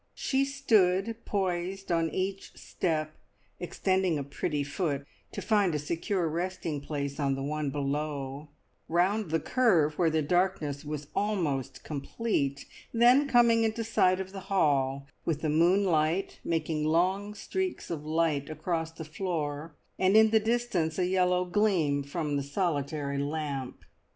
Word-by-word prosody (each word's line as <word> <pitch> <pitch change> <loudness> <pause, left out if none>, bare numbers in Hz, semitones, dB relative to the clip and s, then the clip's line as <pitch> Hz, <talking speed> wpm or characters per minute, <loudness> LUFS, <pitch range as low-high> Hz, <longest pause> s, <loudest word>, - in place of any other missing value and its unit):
She 270 0 +1
stood 225 -6 +2
poised 190 -1 -2
on 165 -1 +2
each 190 +4 -3
step, 155 -3 -2 0.5
extending 185 -1 0
a 140 - -2
pretty 145 +1 -2
foot 140 -1 -2 0.3
to - - -6
find 205 -7 +2
a - - +2
secure 170 +4 -1
resting 170 -2 -3
place 140 0 -4
on 140 -2 +1
the 135 - -4
one 150 0 -2
below; 145 0 -3 0.4
round 185 +4 +1
the 165 +1 +1
curve 170 - +2
where 170 -2 +4
the 160 -1 +1
darkness 160 -3 0
was 150 -1 -5
almost 155 - -1
complete, 140 -2 -2 0.3
then 245 +5 +5
coming 235 -3 +5
into 225 +1 0
sight 185 -4 +2
of 190 0 -5
the 195 - -6
hall, 140 -7 +2 0.2
with 155 -2 -1
the 155 - +1
moonlight 170 +1 +2
making 160 -2 -1
long 185 +6 +1
streaks 375 - -3
of 155 -3 -4
light 155 -2 0
across 160 +1 -2
the 165 -1 -8
floor, 155 -2 -3 0.2
and 190 +3 +4
in 220 0 +6
the 220 - +5
distance 220 -8 0
a 185 - +2
yellow 180 0 +2
gleam 175 -7 +2
from 145 +1 -2
the 140 - -1
solitary 145 -2 -2
lamp. 140 -3 -4
165 Hz, 145 wpm, -29 LUFS, 150-195 Hz, 0.5 s, in